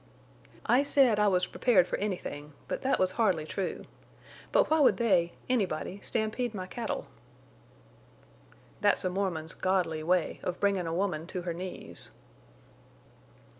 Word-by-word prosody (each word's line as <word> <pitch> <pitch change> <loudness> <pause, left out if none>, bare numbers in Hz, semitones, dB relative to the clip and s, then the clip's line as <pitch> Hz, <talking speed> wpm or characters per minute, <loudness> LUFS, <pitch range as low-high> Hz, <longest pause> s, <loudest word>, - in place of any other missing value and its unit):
"I 250 +3 +4
said 270 -6 +3
I 210 - +4
was 180 -2 +3
prepared 205 -8 +3
for - - -3
anything; 155 -7 -4
but - - -3
that 270 - +2
was 185 0 +2
hardly 185 -7 +1
true. 190 +4 -4 0.7
But - - +3
why 315 - +4
would 285 - +5
they—anybody 195 -2 0
stampede 225 +1 -2
my 185 -2 -4
cattle?" 230 +5 -4 1.7
"That's 205 -2 +2
a 185 - +1
Mormon's 180 -4 -2
godly 180 -4 0
way 175 +1 +1
of 180 - -3
bringin' 195 -4 +1
a - - -2
woman 175 -4 -1
to 180 -1 -5
her 170 -1 -2
knees." 180 +2 -8
190 Hz, 135 wpm, -29 LUFS, 175-215 Hz, 1.7 s, would